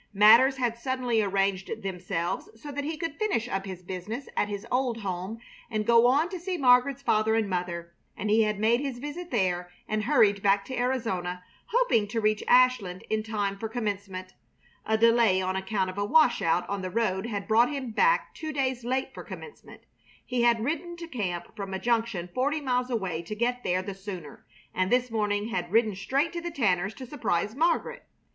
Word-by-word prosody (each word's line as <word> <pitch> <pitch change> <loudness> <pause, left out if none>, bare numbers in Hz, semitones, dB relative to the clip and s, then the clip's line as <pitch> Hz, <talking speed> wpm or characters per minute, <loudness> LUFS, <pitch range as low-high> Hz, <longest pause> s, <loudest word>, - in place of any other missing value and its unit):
Matters 230 +7 +7
had 235 -2 -1
suddenly 250 -3 0
arranged 195 -1 -1
themselves 180 -2 -3
so 290 +4 -8
that 285 +1 -3
he 315 +1 -3
could 325 -2 -5
finish 395 - 0
up 195 -3 -3
his 185 -1 -7
business 190 +9 -6
at - - +1
his 205 +1 -5
old 250 -3 0
home 190 +2 -4 0.3
and 215 -1 -1
go 235 +1 +6
on 285 +6 +3
to 370 -2 -5
see 360 +1 -3
Margaret's 255 0 +4
father 220 -2 +2
and 225 -2 +1
mother, 175 -2 -3 0.2
and 210 - -3
he 220 +1 +5
had 210 -1 +1
made 225 +3 +3
his 275 -3 -3
visit 295 +7 -6
there 180 -6 0 0.2
and 215 -1 -1
hurried 220 -8 +4
back 200 0 +3
to 260 - -5
Arizona, 225 -9 -2 0.2
hoping 460 - +2
to 225 +2 -2
reach 215 -1 +1
Ashland 250 -8 +3
in 220 0 +1
time 205 -3 -2
for 225 - -4
Commencement. 200 -5 -4 0.5
A 220 - +2
delay 230 -4 +4
on 185 0 -1
account 190 0 -1
of 190 - -7
a - - +1
washout 220 - +3
on 200 -1 -3
the 185 - -4
road 205 -1 0
had 205 -4 -4
brought 230 +2 +4
him 275 -5 -4
back 485 - +2
two 315 -1 -5
days 260 -4 -1
late 260 +2 -1
for - - -8
Commencement. 455 - -11 0.4
He 250 -1 -1
had 235 -2 +3
ridden 345 +4 -3
to 340 -1 -7
camp 195 - -4
from 195 -2 -5
a - - -3
junction 225 -6 0
forty 285 +5 0
miles 250 -3 0
away 190 -9 -2
to 190 +5 -6
get 245 +3 -1
there 185 +1 0
the 200 - -5
sooner, 185 -6 -9 0.3
and 185 +1 0
this 250 -1 +2
morning 210 -1 0
had 175 -6 -3
ridden 220 -1 +3
straight 270 - -1
to 340 - -3
the 345 - -4
Tanners' 200 - 0
to 260 - -8
surprise 220 - -1
Margaret. 325 +7 0
220 Hz, 195 wpm, -27 LUFS, 195-255 Hz, 0.5 s, Matters